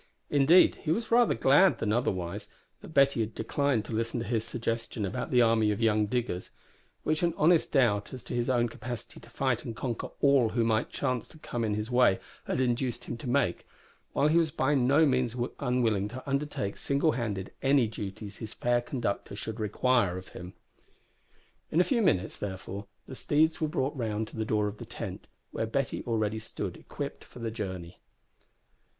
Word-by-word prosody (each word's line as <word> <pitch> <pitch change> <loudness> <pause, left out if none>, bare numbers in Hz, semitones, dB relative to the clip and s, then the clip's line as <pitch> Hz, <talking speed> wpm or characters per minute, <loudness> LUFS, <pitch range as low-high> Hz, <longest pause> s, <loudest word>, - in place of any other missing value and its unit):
Indeed 145 +5 +6
he 155 - -4
was 225 +7 -1
rather 240 0 +5
glad 145 +11 +5
than 105 -1 0
otherwise 95 -5 -1 0.3
that - - -11
Betty 140 -5 +3
had 110 -1 -2
declined 120 0 0
to - - -8
listen 115 +2 -1
to - - -4
his 115 -1 0
suggestion 115 -1 -3
about 125 +7 -3
the 125 -2 +5
army 115 -2 +3
of 105 - -1
young 110 -2 +3
diggers 115 -6 -2 0.5
which 155 0 0
an 170 -2 +1
honest 165 +2 +4
doubt 110 -7 +2
as 130 - -8
to - - -7
his 120 +1 0
own 120 -2 +3
capacity 120 +1 -7
to 115 - -16
fight 125 -1 0
and 115 - -6
conquer 120 -1 -3
all 140 -5 +4
who 115 +2 +1
might 110 0 +1
chance 125 -3 -2
to - - -15
come 120 -6 -4
in 105 -2 0
his 105 +3 -4
way 125 -6 +5 0.3
had - - -1
induced 125 -1 0
him - - -5
to 120 - -6
make 140 0 +1 0.4
while 145 - +2
he 160 +3 +4
was 165 -2 +2
by 145 0 +1
no 140 +4 +4
means 130 -4 +1 0.2
unwilling 120 -7 +1
to 130 +6 -9
undertake, 140 -7 -2
singlehanded, 120 - 0
any 135 -2 +4
duties 105 -1 -7
his 110 0 -7
fair 120 0 +1
conductor 120 -5 -3
should 110 +1 -5
require 105 -2 +2
of 95 - -9
him. 90 +1 -9 1.2
In 160 - +1
a - - +7
few 235 +3 +1
minutes, 110 - +1
therefore, 100 0 -5 0.2
the - - -9
steeds 155 +5 +1
were 155 - +2
brought 150 -3 -1
round 110 -3 -2
to - - -13
the 110 -1 -2
door 105 -1 +1
of 105 +1 -6
the - - -7
tent, - - -7 0.2
where 110 - -2
Betty 135 +3 -1
already 110 -2 0
stood 110 - -5
equipped - - -7
for - - -16
the 115 -2 -3
journey. 95 -6 -6
120 Hz, 190 wpm, -29 LUFS, 110-135 Hz, 1.2 s, a